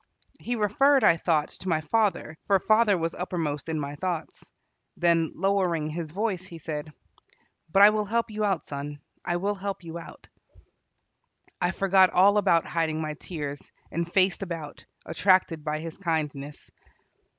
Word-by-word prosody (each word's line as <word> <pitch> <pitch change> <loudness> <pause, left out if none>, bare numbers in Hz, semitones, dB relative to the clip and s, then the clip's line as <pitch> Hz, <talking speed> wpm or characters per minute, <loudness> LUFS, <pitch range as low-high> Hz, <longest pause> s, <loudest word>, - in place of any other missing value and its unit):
He 245 - -3
referred, 260 +6 +3
I 165 - +6
thought, 160 -3 +1
to 185 - -4
my 160 -2 +1
father, 200 -2 0
for 200 - +5
father 215 0 +3
was 165 0 -2
uppermost 165 -5 -3
in 160 -1 -1
my 140 -1 -4
thoughts. 170 +2 -4 0.5
Then, 170 -2 +2
lowering 180 -4 +1
his 160 0 -5
voice, 195 +1 -2
he 175 -3 -10
said: 155 -1 -5 0.8
"But 195 +3 +6
I 210 - +9
will 215 -1 -1
help 230 +2 -1
you 215 0 -2
out, 195 -5 0
son, 145 +1 -6 0.2
I 175 - -1
will 200 +3 -1
help 195 -1 -5
you 165 0 -7
out." 165 - -13 1.3
I 175 - +2
forgot 190 0 +4
all 200 +3 +5
about 170 -5 +3
hiding 160 -2 -1
my 155 -1 -3
tears, 145 -3 -7 0.2
and 170 +1 -3
faced 190 0 +2
about, 165 -6 -6 0.2
attracted 170 -1 +2
by 150 0 -2
his 160 +2 -7
kindness. 150 -5 -3
170 Hz, 160 wpm, -26 LUFS, 155-195 Hz, 1.3 s, I